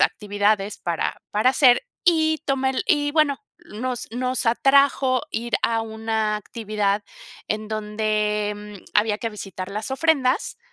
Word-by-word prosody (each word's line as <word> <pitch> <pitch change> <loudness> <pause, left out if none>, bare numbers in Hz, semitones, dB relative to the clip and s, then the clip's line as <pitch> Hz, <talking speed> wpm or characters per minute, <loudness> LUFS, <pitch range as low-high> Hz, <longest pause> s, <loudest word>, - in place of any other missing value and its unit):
actividades 205 0 +1
para 170 -2 -2
para 215 +5 +3
hacer 260 - +5 0.2
y 315 -2 +3
tomé 270 -1 +1
el 265 - -1
y, 290 -6 +2
bueno, 305 -3 +2 0.3
nos 245 +3 -3
nos 255 +1 -1
atrajo 270 +1 +3
ir 235 +1 -2
a 225 -1 +1
una 220 -1 -1
actividad 210 -2 -2 0.5
en 215 0 -2
donde, 210 -1 -1
mm, 210 -2 -11
había 210 0 +2
que 230 - -2
visitar 195 -3 -7
las 210 +5 -4
ofrendas, 270 - +1
225 Hz, 135 wpm, -23 LUFS, 210-265 Hz, 0.5 s, hacer